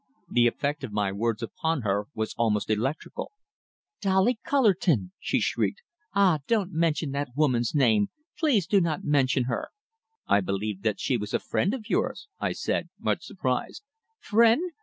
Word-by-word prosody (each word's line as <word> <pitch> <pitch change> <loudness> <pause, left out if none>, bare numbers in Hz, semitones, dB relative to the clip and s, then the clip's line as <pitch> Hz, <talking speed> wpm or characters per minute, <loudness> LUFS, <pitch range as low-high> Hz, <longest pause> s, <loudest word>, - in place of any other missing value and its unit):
The 120 0 +4
effect 145 +5 -2
of - - -5
my 105 -2 0
words 115 +3 -1
upon 160 +3 -2
her 100 0 0
was 110 0 -2
almost 110 -2 +1
electrical. 130 - -2 0.7
"Dolly 195 +5 +2
Cullerton!" 185 - +2
she - - 0
shrieked. 480 - -1 0.3
"Ah! 190 -6 +4
Don't 205 -5 +1
mention 160 -3 0
that 140 -2 -3
woman's 130 -4 +1
name! 110 -7 +4 0.3
Please 265 - +2
do 195 +2 +3
not 165 -3 -1
mention 135 -3 +2
her!" 120 -1 -2 0.6
"I 100 - +3
believed 100 +1 -3
that 105 -2 0
she 130 - +1
was 105 -1 -3
a - - +2
friend 200 +7 0
of 220 -5 -9
yours," - - -1
I - - 0
said, - - -2
much - - -1
surprised. 430 - -3 0.4
"Friend? 235 - +3
140 Hz, 160 wpm, -27 LUFS, -, 0.7 s, The